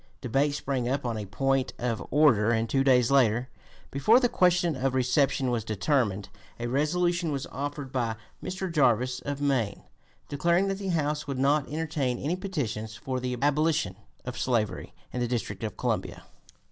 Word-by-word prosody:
Debate 140 Hz, +4 st, +1 dB
sprang 130 Hz, -4 st, -2 dB
up 135 Hz, 0 st, -1 dB
on 120 Hz, -2 st, -1 dB
a 105 Hz, -2 st, -5 dB
point 135 Hz, +7 st, 0 dB
of 120 Hz, -2 st, -2 dB
order, 130 Hz, -8 st, +4 dB
and 115 Hz, -1 st, +1 dB
two 135 Hz, +4 st, +2 dB
days 125 Hz, -2 st, +4 dB
later, 125 Hz, -2 st, +3 dB, 0.4 s
before 215 Hz, -, +5 dB
the 250 Hz, -, +3 dB
question 180 Hz, -6 st, +2 dB
of 130 Hz, 0 st, -1 dB
reception 130 Hz, 0 st, +2 dB
was 115 Hz, -2 st, -1 dB
determined, 110 Hz, -2 st, 0 dB, 0.3 s
a 120 Hz, -, -3 dB
resolution 170 Hz, +6 st, +1 dB
was 140 Hz, -2 st, -2 dB
offered 145 Hz, 0 st, -5 dB
by 120 Hz, -4 st, -1 dB, 0.3 s
Mr. 185 Hz, -1 st, -4 dB
Jarvis, 125 Hz, -3 st, +2 dB
of 145 Hz, 0 st, -4 dB
Maine, 130 Hz, -8 st, 0 dB, 0.4 s
declaring 170 Hz, +7 st, +1 dB
that 195 Hz, 0 st, -2 dB
the 195 Hz, -, -4 dB
House 150 Hz, -4 st, -1 dB
would 140 Hz, -2 st, -3 dB
not 140 Hz, +2 st, +2 dB
entertain 150 Hz, -5 st, -1 dB
any 150 Hz, +8 st, -1 dB
petitions 120 Hz, -, -4 dB
for 130 Hz, +3 st, -3 dB
the 125 Hz, 0 st, -3 dB
abolition 145 Hz, -, +2 dB, 0.3 s
of 125 Hz, 0 st, -5 dB
slavery 115 Hz, -5 st, -1 dB, 0.2 s
in 125 Hz, -, -2 dB
the 120 Hz, -, 0 dB
District 115 Hz, -4 st, -3 dB
of 110 Hz, -, -4 dB
Columbia. -, -, -2 dB
135 Hz, 170 wpm, -27 LUFS, 120-150 Hz, 0.4 s, before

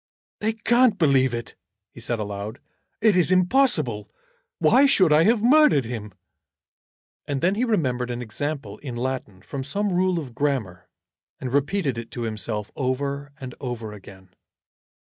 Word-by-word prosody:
"They 220 Hz, +1 st, 0 dB
can't 235 Hz, +2 st, +3 dB
believe 135 Hz, -5 st, +3 dB
it," 120 Hz, -1 st, -5 dB, 0.4 s
he -, -, -13 dB
said 120 Hz, +1 st, -1 dB
aloud. 105 Hz, +2 st, -5 dB, 0.4 s
"It 215 Hz, -3 st, +4 dB
is 180 Hz, -2 st, +3 dB
impossible. 180 Hz, -, +2 dB, 0.5 s
Why 280 Hz, +2 st, +5 dB
should 185 Hz, -, +4 dB
I 155 Hz, +2 st, +5 dB
have 220 Hz, 0 st, +3 dB
murdered 275 Hz, -, +5 dB
him?" 105 Hz, -4 st, -6 dB, 1.1 s
And 140 Hz, -2 st, -2 dB
then 185 Hz, +3 st, +3 dB
he 220 Hz, +5 st, 0 dB
remembered 130 Hz, -, 0 dB
an 120 Hz, 0 st, -3 dB
example 125 Hz, -1 st, -4 dB
in 130 Hz, -4 st, -7 dB
Latin 120 Hz, -6 st, -4 dB
from 140 Hz, -2 st, -5 dB
some 200 Hz, +8 st, -1 dB
rule 185 Hz, 0 st, +2 dB
of 140 Hz, -7 st, -5 dB
grammar, 120 Hz, -10 st, -2 dB, 0.5 s
and 125 Hz, -1 st, -5 dB
repeated 145 Hz, -2 st, 0 dB
it 115 Hz, -, -8 dB
to 120 Hz, -, -2 dB
himself 105 Hz, -1 st, -3 dB
over 140 Hz, +2 st, -2 dB
and 130 Hz, -3 st, -7 dB
over 120 Hz, -5 st, -5 dB
again. 95 Hz, -2 st, -14 dB
135 Hz, 150 wpm, -24 LUFS, 115-185 Hz, 1.1 s, Why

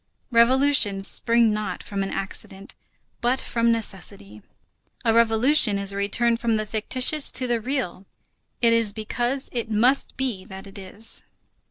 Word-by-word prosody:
Revolutions 235 Hz, -5 st, +4 dB
spring 230 Hz, -2 st, +2 dB
not 210 Hz, -4 st, -4 dB
from 200 Hz, -1 st, -4 dB
an 195 Hz, -, -3 dB
accident, 195 Hz, 0 st, -6 dB, 0.5 s
but 245 Hz, +2 st, +1 dB
from 235 Hz, 0 st, 0 dB
necessity. 175 Hz, -, -4 dB, 0.6 s
A 225 Hz, -, +3 dB
revolution 230 Hz, 0 st, +3 dB
is 200 Hz, 0 st, +2 dB
a -, -, -8 dB
return 230 Hz, +4 st, +1 dB
from 230 Hz, -1 st, 0 dB
the 215 Hz, 0 st, -2 dB
fictitious 255 Hz, +7 st, +2 dB
to 255 Hz, -, -2 dB
the 240 Hz, -2 st, -1 dB
real. 225 Hz, -7 st, -4 dB, 0.6 s
It 230 Hz, -1 st, +5 dB
is 230 Hz, -3 st, +1 dB
because 240 Hz, +5 st, -3 dB
it 235 Hz, -2 st, -4 dB
must 240 Hz, +6 st, +1 dB
be 250 Hz, -8 st, -3 dB
that 190 Hz, 0 st, -10 dB
it 195 Hz, 0 st, -11 dB
is. 200 Hz, +4 st, -2 dB
225 Hz, 150 wpm, -23 LUFS, 200-240 Hz, 0.6 s, It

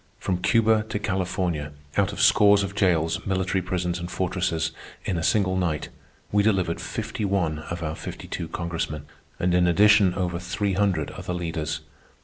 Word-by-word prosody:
From 90 Hz, -2 st, -2 dB
Cuba 110 Hz, +1 st, +3 dB
to 105 Hz, -, -1 dB
California, 90 Hz, -6 st, -2 dB, 0.2 s
out 100 Hz, -1 st, +2 dB
of 100 Hz, -, -7 dB
scores 100 Hz, -1 st, +6 dB
of 100 Hz, 0 st, -4 dB
jails, 85 Hz, -6 st, +1 dB
military 95 Hz, 0 st, 0 dB
prisons, 90 Hz, -1 st, -2 dB
and 85 Hz, 0 st, -5 dB
fortresses, 90 Hz, -4 st, -1 dB, 0.3 s
in 95 Hz, -, -1 dB
a 85 Hz, -, -1 dB
single 95 Hz, +2 st, +2 dB
night, 85 Hz, -5 st, -1 dB, 0.4 s
we 105 Hz, -, +4 dB
delivered 95 Hz, -5 st, +1 dB
fifty -, -, -4 dB
one 90 Hz, -6 st, 0 dB
of 85 Hz, 0 st, -4 dB
our 75 Hz, -1 st, -2 dB
fifty -, -, -7 dB
two -, -, -4 dB
Congressmen, 80 Hz, -3 st, -4 dB, 0.3 s
and 90 Hz, 0 st, +1 dB
in 90 Hz, 0 st, +4 dB
addition 100 Hz, +1 st, +5 dB
over 90 Hz, -2 st, -1 dB
three 95 Hz, +3 st, -1 dB
hundred 95 Hz, -6 st, +1 dB
other 90 Hz, -, -5 dB
leaders. 80 Hz, -3 st, -3 dB
90 Hz, 165 wpm, -25 LUFS, 85-100 Hz, 0.4 s, scores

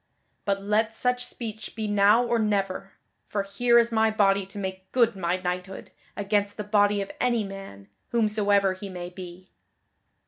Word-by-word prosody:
But 195 Hz, -1 st, 0 dB
let 215 Hz, +2 st, +1 dB
such 250 Hz, +1 st, 0 dB
speech 220 Hz, -3 st, -7 dB
be 220 Hz, -1 st, -3 dB
now 205 Hz, +3 st, +4 dB
or 235 Hz, -1 st, +1 dB
never, 195 Hz, -2 st, -1 dB, 0.3 s
for 200 Hz, -1 st, -1 dB
here 235 Hz, +5 st, +3 dB
is 235 Hz, 0 st, +4 dB
my 220 Hz, 0 st, +3 dB
body 200 Hz, -3 st, +2 dB
to 195 Hz, -, -12 dB
make 190 Hz, -1 st, -5 dB
good 235 Hz, -4 st, +3 dB
my 180 Hz, -1 st, 0 dB
knighthood 180 Hz, +1 st, -5 dB, 0.3 s
against 205 Hz, 0 st, 0 dB
the 210 Hz, -, -3 dB
body 205 Hz, -1 st, +2 dB
of 195 Hz, -, -9 dB
any 240 Hz, -3 st, +2 dB
man, 195 Hz, -, -9 dB, 0.2 s
whomsoever 205 Hz, -4 st, +2 dB
he 195 Hz, +1 st, -8 dB
may 180 Hz, -1 st, -7 dB
be." 180 Hz, 0 st, -10 dB
205 Hz, 165 wpm, -26 LUFS, 195-220 Hz, 0.3 s, now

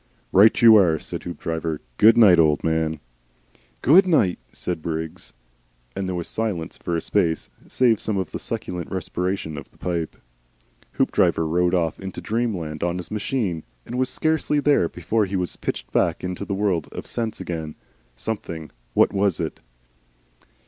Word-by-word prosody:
"Right 105 Hz, +3 st, +6 dB
you 115 Hz, -1 st, +10 dB
are!" 85 Hz, -6 st, +4 dB
said -, -, -6 dB
Hoopdriver. 80 Hz, -2 st, -4 dB, 0.2 s
"Good 110 Hz, +2 st, +7 dB
night, 100 Hz, -7 st, +7 dB
old 75 Hz, -2 st, +3 dB
man." 80 Hz, -1 st, 0 dB, 0.8 s
"Good 185 Hz, +7 st, +6 dB
night," 110 Hz, -, +3 dB
said 90 Hz, -3 st, -4 dB
Briggs, 80 Hz, 0 st, -5 dB, 0.6 s
and 95 Hz, -, -2 dB
there 90 Hz, -, -2 dB
was 85 Hz, -1 st, -4 dB
silence 105 Hz, -8 st, -3 dB
for 85 Hz, -, -3 dB
a -, -, -2 dB
space, 85 Hz, -5 st, 0 dB, 0.2 s
save 120 Hz, -4 st, +3 dB
for 100 Hz, -3 st, -1 dB
the 85 Hz, -, -7 dB
succulent 90 Hz, -1 st, -5 dB
respiration 90 Hz, -3 st, -3 dB
of -, -, -12 dB
the -, -, -26 dB
pipe. 85 Hz, -3 st, -3 dB, 0.8 s
Hoopdriver 80 Hz, -, +2 dB
rode 90 Hz, +2 st, +2 dB
off 85 Hz, -3 st, 0 dB
into 95 Hz, -1 st, -6 dB
Dreamland 95 Hz, -10 st, -2 dB
on 85 Hz, 0 st, 0 dB
his 90 Hz, -, -7 dB
machine, 105 Hz, -6 st, -1 dB, 0.2 s
and -, -, -8 dB
was 130 Hz, 0 st, +2 dB
scarcely 155 Hz, -2 st, +1 dB
there 145 Hz, -, +3 dB
before 105 Hz, +5 st, 0 dB
he 95 Hz, -, -4 dB
was 90 Hz, -2 st, -2 dB
pitched -, -, -5 dB
back 85 Hz, -, +1 dB
into 90 Hz, +2 st, -4 dB
the 100 Hz, -, -2 dB
world 95 Hz, -6 st, 0 dB
of -, -, -7 dB
sense 115 Hz, -2 st, -3 dB
again. 80 Hz, -3 st, -5 dB, 0.4 s
Something 80 Hz, -, -5 dB, 0.2 s
what -, -, +4 dB
was 100 Hz, -2 st, +1 dB
it? -, -, -3 dB
90 Hz, 160 wpm, -23 LUFS, 80-105 Hz, 0.8 s, you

